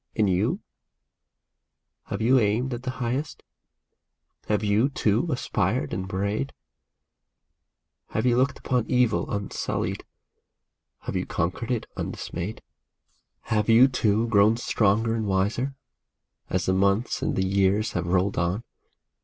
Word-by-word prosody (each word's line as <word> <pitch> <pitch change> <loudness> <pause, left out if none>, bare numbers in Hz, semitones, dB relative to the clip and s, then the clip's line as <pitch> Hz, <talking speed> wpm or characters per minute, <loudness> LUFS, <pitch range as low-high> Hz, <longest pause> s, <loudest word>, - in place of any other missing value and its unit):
And 105 -2 +3
you? 90 -1 +1 1.4
Have - - -3
you 130 +3 +5
aimed 115 +4 +1
at 120 - -5
the 130 - -4
highest? 130 +4 -3 1.0
Have 105 0 +1
you, 105 +6 +3
too, 115 0 +1
aspired 110 -3 -1
and 95 0 -3
prayed? 100 +8 -2 1.5
Have 110 - -2
you 120 -1 +4
looked 130 +2 +2
upon 125 -3 -1
evil 125 -4 +2
unsullied? 100 -1 -3 1.0
have - - -5
you - - -1
conquered 90 +8 -2
it 120 -3 -1
undismayed? 90 +6 -5 0.8
Have 105 -1 0
you, 115 +3 +8
too, 115 -3 +1
grown 105 +1 +4
stronger 115 -1 +1
and 110 -2 -1
wiser, 105 +8 0 0.7
as 90 - 0
the 95 - +2
months 100 +4 +1
and - - -1
the 95 - +1
years 100 +3 +2
have - - -2
rolled 95 +2 +1
on 90 +6 -1
110 Hz, 130 wpm, -25 LUFS, 100-120 Hz, 1.5 s, you